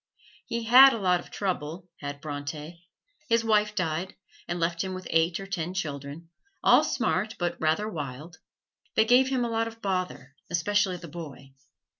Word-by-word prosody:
He 235 0 -2
had 260 +4 +9
a - - -2
lot 180 -3 +2
of - - -12
trouble, 175 -2 -3
had 145 0 -6
Bronte: 150 +3 -7 0.4
his 230 0 +3
wife 210 -1 +2
died 180 -1 -2 0.3
and 175 0 -3
left 170 +1 0
him 190 -1 -4
with 185 - -8
eight 165 +2 +2
or 195 - -6
ten 180 -1 -4
children, 150 0 -5 0.3
all - - +6
smart, 215 +4 -1
but 175 -1 -2
rather 160 +7 +1
wild. 150 -2 -7 0.6
They 220 - +5
gave 250 +3 +5
him 255 -2 0
a 235 - -3
lot 225 0 0
of 230 0 -10
bother, 185 -9 -3 0.2
especially 190 +2 +1
the 170 - -10
boy. 145 -4 -9
175 Hz, 170 wpm, -27 LUFS, 160-210 Hz, 0.6 s, had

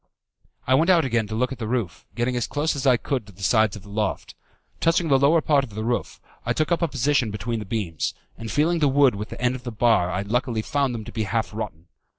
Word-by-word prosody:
I 130 - +2
went 160 +7 +4
out 170 -5 +5
again 115 -4 0
to 110 - -4
look 125 +3 0
at 135 - -6
the 110 - -3
roof, 115 -7 -3
getting 120 +1 0
as 120 - -1
close 150 +2 -1
as 140 0 -1
I 125 -2 +6
could 125 -1 -3
to - - -12
the 100 +1 -12
sides 110 +2 +3
of 105 - -10
the 100 - -13
loft. 105 -1 -2 0.5
Touching 165 0 +2
the 135 -1 +5
lower 155 +4 +4
part 145 -3 +3
of 110 -6 -9
the 110 - -3
roof, 120 +1 -2 0.2
I - - 0
took 155 +2 -1
up 170 - +2
a 170 - +2
position 140 -3 +1
between 110 +2 -3
the 105 - -6
beams, 95 -6 -2 0.2
and 115 -1 -7
feeling 165 +4 +2
the 150 - +3
wood 135 -2 +4
with 105 +1 -6
the - - -8
end 125 0 +1
of 130 - -6
the 125 -1 -6
bar 110 -5 +3
I 95 +1 -2
luckily 115 +1 -1
found 140 -3 0
them 110 - -5
to - - -9
be 110 -2 -2
half 110 +3 -2
rotten. 85 -7 -6
120 Hz, 265 wpm, -24 LUFS, 110-140 Hz, 0.5 s, I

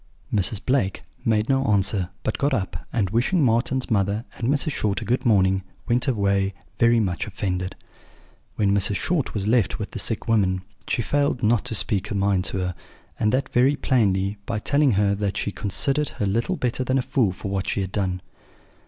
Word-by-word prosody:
"Mrs. 100 0 +2
Blake 125 -8 0 0.2
made 110 0 +1
no 135 -1 +2
answer, 100 -3 +2
but 110 - -2
got 140 -1 +2
up, 95 -4 -4
and, 100 -5 0
wishing 130 - +2
Marten's 125 +2 +1
mother 100 +2 +1
and 115 - -2
Mrs. 145 +2 +1
Short 105 -7 0
a 115 - -6
good 125 +3 0
morning, 95 -3 +3 0.3
went 120 +1 +2
away 100 -5 +1 0.2
very 120 0 +5
much 95 -3 -1
offended. 90 -2 -3 0.8
"When 100 -2 +2
Mrs. 100 0 +1
Short 155 - -1
was 100 -1 -1
left 115 -3 +2
with - - -5
the - - -5
sick - - -2
woman 95 -5 +2 0.2
she 120 - 0
failed 140 -1 0
not 115 +1 +2
to 110 - -4
speak 95 0 0
her - - -4
mind 100 -1 +1
to 95 - -2
her, 90 -1 -2 0.4
and 105 - +2
that 130 +3 0
very 130 +4 +3
plainly, 100 -7 +1
by 115 - -1
telling 140 +4 +2
her 100 0 +2
that 100 -1 -2
she 100 - -1
considered 135 +10 0
her 105 - -3
little 115 - 0
better 125 -4 -1
than 130 +1 +1
a 130 - +1
fool 125 -6 +1
for 95 +2 -6
what 95 -1 -2
she 100 - 0
had 95 -1 -4
done. 95 -3 -2
105 Hz, 195 wpm, -24 LUFS, 95-125 Hz, 0.8 s, very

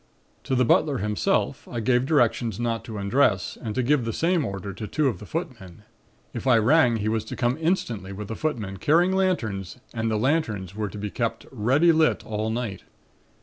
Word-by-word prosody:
"To 130 - 0
the 125 0 +3
butler 140 +4 +3
himself 105 -4 -1
I 120 - -4
gave 125 +3 +2
directions 120 - +1
not 115 -1 -1
to 110 -2 -6
undress 100 -1 +1
and 110 -3 -4
to 130 - +1
give 140 +1 +2
the 115 - -2
same 170 - +1
order 100 -3 -5
to 105 +3 -6
two 150 +4 +1
of 110 -9 -1
the 105 - -10
footmen. 115 - -6 0.5
If - - -5
I 125 -3 +6
rang 125 +2 +4
he 105 0 -2
was 110 0 0
to - - -6
come 120 +1 +1
instantly, 120 - -1
with 100 +1 -6
the 110 - -5
footmen, 110 -11 -3
carrying 170 - +3
lanterns 110 - -1 0.2
and 115 -1 -1
the 110 - 0
lanterns 110 - 0
were 105 -1 -2
to 100 - -9
be 105 0 -4
kept - - -2
ready 135 +11 +3
lit 160 -1 +2
all 110 0 -2
night. 110 -4 -3
115 Hz, 200 wpm, -25 LUFS, 105-140 Hz, 0.5 s, I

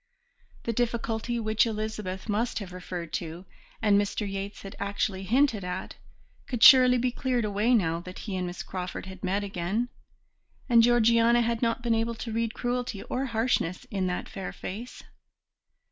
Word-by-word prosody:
The 230 - -1
difficulty 235 0 -1
which 220 +1 +2
Elizabeth 215 -3 -4
must 220 +3 0
have 195 -4 -6
referred 175 -3 -6
to, 170 +2 -8 0.4
and 205 -1 +5
Mr. 205 +1 -2
Yates 195 +1 -5
had 195 - -8
actually 200 -1 -1
hinted 230 +1 +2
at, 180 0 -4 0.5
could 245 -3 -1
surely 255 -2 +9
be 250 +1 +1
cleared 250 -2 0
away 210 +4 +2
now 165 -6 +1
that 185 +1 -9
he 200 - -3
and 180 -1 -2
Miss 175 - -6
Crawford 185 -1 -5
had 190 -1 -10
met 195 +2 0
again; 200 +5 -2 0.8
and 235 -3 +6
Georgiana 235 0 +5
had 230 -1 -1
not 230 0 0
been 235 -1 +2
able 225 +1 0
to 225 +1 -6
read 230 0 -1
cruelty 245 -4 -2
or 265 +2 -2
harshness 225 -7 0
in 190 -2 0
that 180 - -3
fair 195 -2 -6
face. 230 +6 -7
215 Hz, 165 wpm, -28 LUFS, 190-235 Hz, 0.8 s, surely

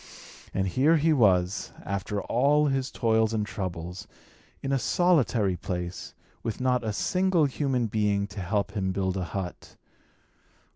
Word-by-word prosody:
And 95 0 0
here 140 - +3
he 160 +1 +3
was, 95 -7 +2
after 100 +1 -3
all 145 +5 +3
his 135 -2 0
toils 110 -2 +1
and 105 -1 0
troubles, 90 -3 -5 0.6
in 135 - -2
a 135 - +2
solitary 125 - +2
place, 90 0 -5 0.3
with 115 -3 -4
not 125 -1 +1
a 110 - -1
single 180 - +2
human 135 -3 0
being 105 -2 +1
to 105 - -8
help 100 +2 -1
him 95 -2 -1
build 95 -1 -1
a 95 -2 -2
hut. 90 0 -6
110 Hz, 145 wpm, -27 LUFS, 95-135 Hz, 0.6 s, here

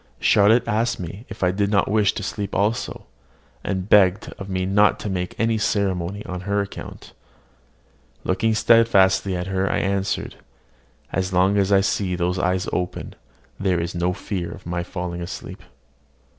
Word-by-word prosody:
Charlotte 110 +4 +4
asked 115 +2 0
me 95 +7 -7
if 110 -3 -6
I 90 - +3
did 100 +1 0
not 100 -2 +2
wish 105 -1 +3
to - - -5
sleep 100 -2 -4
also, 105 +4 -1 0.6
and 95 -1 -2
begged 100 -1 +4
of 100 -1 -7
me 95 -1 -1
not 105 +2 +3
to 105 - -3
make 90 -1 -4
any 115 -1 +1
ceremony 100 -1 -1
on 90 -1 -5
her 100 +2 -1
account. 100 0 -7 1.1
Looking 110 +4 +1
steadfastly 100 -5 +4
at 90 - -3
her, 95 0 0
I - - 0
answered, 100 0 -1 0.8
"As 95 0 -1
long 95 +2 +3
as 100 0 +1
I 100 -1 +5
see 95 -2 0
those 90 +1 -1
eyes 90 +1 0
open, 90 -1 -3 0.5
there 95 -3 +1
is 85 +1 -3
no 90 0 0
fear 90 -2 -4
of - - -11
my 85 0 -2
falling 90 -1 -5
asleep." 85 - -7
95 Hz, 165 wpm, -22 LUFS, 90-100 Hz, 1.1 s, I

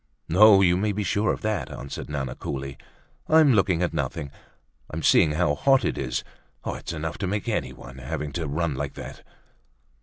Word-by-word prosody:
"No, 100 +3 +7
you 90 -2 +4
may 105 +2 0
be 105 +1 -2
sure 100 +3 +1
of - - -4
that," 105 -4 -2
answered 70 - -7
Nana 70 -4 -3
coolly. 70 0 -5 0.5
"I'm 155 -4 +6
looking 95 -5 +2
at 90 - -1
nothing—I'm 70 -1 -7
seeing 75 - +5
how 75 -2 +2
hot 135 - +3
it - - 0
is. 65 -2 -2 0.4
It's - - -4
enough 80 0 -4
to 95 - -1
make 100 +2 -2
anyone, 65 +1 -4
having 70 +3 -4
to 80 0 -3
run 80 +2 -1
like 65 +1 -4
that." - - -9
85 Hz, 175 wpm, -25 LUFS, 70-100 Hz, 0.5 s, No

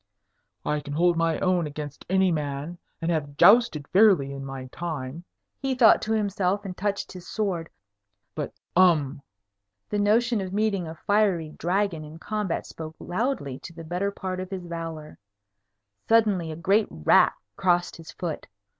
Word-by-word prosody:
"I 150 - 0
can 145 0 -7
hold 175 +3 +3
my 165 -1 +1
own 180 -3 +2
against 145 -1 -8
any 190 0 +3
man, 150 +2 -3 0.2
and 165 - +1
have 145 -3 -2
jousted 190 - +5
fairly 185 -9 +5
in 135 0 -6
my 135 -1 -6
time," 160 -1 -5 0.3
he 270 -1 -1
thought 235 -4 +6
to 220 - -1
himself, 200 -2 0
and 185 -2 -5
touched 200 +1 -2
his 180 -1 -10
sword. 185 -7 -2 0.6
"But - - -4 0.2
um!" 155 -6 +4 0.7
The 210 - 0
notion 225 +2 +3
of 185 -1 -5
meeting 200 -4 0
a 160 - -7
fiery 200 -6 +2
dragon 175 0 -1
in 155 +1 -10
combat 210 -1 -3
spoke 160 -1 -8
loudly 175 - -2
to 170 - -10
the 165 0 -9
better 180 +5 -1
part 185 -2 -5
of 185 0 -5
his 190 -2 -5
valour. 165 -2 -6 0.9
Suddenly 210 -8 +3
a - - -5
great 195 +6 +2
rat 75 - +4 0.2
crossed 175 -2 +1
his 165 -1 -11
foot. 165 0 -5
175 Hz, 160 wpm, -26 LUFS, 155-200 Hz, 0.9 s, thought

